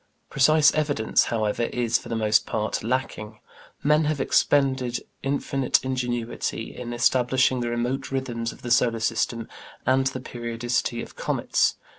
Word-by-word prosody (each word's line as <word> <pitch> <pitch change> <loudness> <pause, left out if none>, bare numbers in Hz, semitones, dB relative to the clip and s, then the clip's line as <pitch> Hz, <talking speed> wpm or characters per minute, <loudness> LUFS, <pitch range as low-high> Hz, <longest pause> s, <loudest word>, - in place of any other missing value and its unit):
Precise 150 +2 +5
evidence, 145 -8 +1
however, 110 0 0
is, 120 -1 0
for - - -11
the 115 - -2
most 110 -1 +2
part, 110 -1 -2
lacking. 110 -3 -3 0.5
Men 150 +1 +3
have 150 -1 -1
expended 130 -2 +2 0.2
infinite 135 -1 +1
ingenuity 120 -3 -3
in 120 -1 -6
establishing 125 +2 +2
the 120 -1 -2
remote 125 +3 -2
rhythms 120 -4 -2
of - - -16
the 120 - -4
solar 115 -1 +3
system 115 0 -1 0.4
and 130 +1 +3
the 130 -1 -3
periodicity 120 -1 -3
of - - -12
comets. - - +1
125 Hz, 140 wpm, -25 LUFS, 115-135 Hz, 0.5 s, Precise